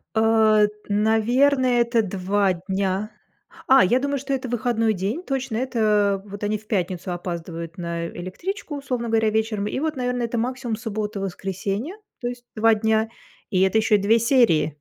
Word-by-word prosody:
Э, 220 -1 +4 0.2
наверное, 240 +5 +3
это 235 -1 +2
2 195 0 0 0.2
дня. 195 +2 -1 0.6
А, 265 0 +7
я 240 +8 +3
думаю, 280 +1 -1
что 275 +1 -3
это 260 -2 -3
выходной 230 -2 +1
день 205 - -2
точно. 270 -6 -2
Это 210 -6 +1
вот 205 0 -9
они 210 +1 0
в 210 +1 -19
пятницу 185 -2 -2
опаздывают 170 -1 -5
на 170 -1 -3
электричку, 295 - -6
условно 250 -4 -3
говоря, 220 -1 +2
вечером. 215 -1 -1
И 235 - -2
вот, 310 0 -1
наверное, 250 -1 -1
это 235 0 -3
максимум 245 0 -2
суббота, 215 -2 -4
воскресенье, 195 - -4 0.3
то 240 - -2
есть 245 0 -6
2 225 0 +4
дня, 220 +1 +1 0.4
и 185 -3 +1
это 190 +3 +3
еще 220 0 +3
и - - +5
2 210 +3 +3
серии. 195 - +3
220 Hz, 165 wpm, -23 LUFS, 195-245 Hz, 0.6 s, А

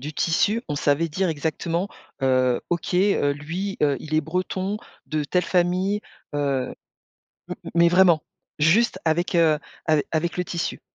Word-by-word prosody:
du 150 +4 -6
tissu, 205 +9 +1
on 145 - -2
savait 145 +3 +1
dire 185 +4 0
exactement, 165 +4 -2 0.3
heu: 130 -2 +3
«OK, 175 0 -1
heu, 180 -6 +3
lui, 170 +8 -4
heu, 145 -2 +3
il 155 +4 -6
est 155 - +4
breton, 185 +5 -2 0.3
de 155 -1 -1
telle 180 +5 +1
famille, 185 +3 +1 0.3
heu» 140 -3 -1 0.7
m - - -3 0.2
mais 170 0 +6
vraiment, 175 -3 +5 0.4
juste 185 +8 +3
avec, 170 +3 0
heu, 160 -3 +4 0.3
ave 155 -2 +3
avec 170 +1 0
le 180 - +1
tissu. 170 -1 -3
165 Hz, 155 wpm, -24 LUFS, 150-180 Hz, 0.7 s, mais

